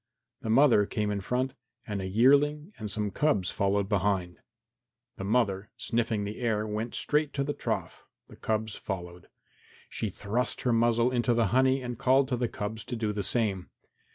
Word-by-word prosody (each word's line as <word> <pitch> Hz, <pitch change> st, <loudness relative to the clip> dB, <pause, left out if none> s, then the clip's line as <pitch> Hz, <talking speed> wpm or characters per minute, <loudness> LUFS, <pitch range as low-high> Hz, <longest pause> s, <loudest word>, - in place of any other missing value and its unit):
The 110 Hz, -, -4 dB
mother 115 Hz, -4 st, +5 dB
came 105 Hz, -1 st, -1 dB
in 100 Hz, -1 st, -2 dB
front 125 Hz, +6 st, -1 dB, 0.3 s
and 105 Hz, -3 st, -3 dB
a 95 Hz, -, -3 dB
yearling 145 Hz, -, +3 dB
and 110 Hz, -1 st, -4 dB
some 105 Hz, 0 st, -2 dB
cubs 100 Hz, -7 st, +1 dB
followed 100 Hz, 0 st, +1 dB
behind. 95 Hz, -3 st, 0 dB, 0.8 s
The -, -, -5 dB
mother, 105 Hz, -1 st, +1 dB
sniffing 115 Hz, -3 st, -1 dB
the 105 Hz, +1 st, -5 dB
air, 110 Hz, -3 st, 0 dB
went 110 Hz, +2 st, -3 dB
straight 150 Hz, 0 st, +1 dB
to 140 Hz, -, 0 dB
the 145 Hz, +1 st, -2 dB
trough, -, -, -4 dB, 0.2 s
the -, -, -14 dB
cubs 110 Hz, -1 st, -2 dB
following. 90 Hz, -3 st, -6 dB, 0.7 s
She 110 Hz, -, -2 dB
thrust 105 Hz, +5 st, -2 dB
her 125 Hz, -, +1 dB
muzzle 115 Hz, +1 st, +3 dB
into 120 Hz, -1 st, +1 dB
the 115 Hz, -4 st, +2 dB
honey 130 Hz, +1 st, +3 dB
and 120 Hz, -1 st, -5 dB
called 130 Hz, +1 st, +3 dB
to 125 Hz, -, +1 dB
the 120 Hz, -1 st, -1 dB
cubs 105 Hz, +1 st, -5 dB
to 125 Hz, -, -4 dB
do 110 Hz, -2 st, -1 dB
the 105 Hz, -, -2 dB
same. 100 Hz, -2 st, -1 dB
110 Hz, 180 wpm, -29 LUFS, 100-125 Hz, 0.8 s, mother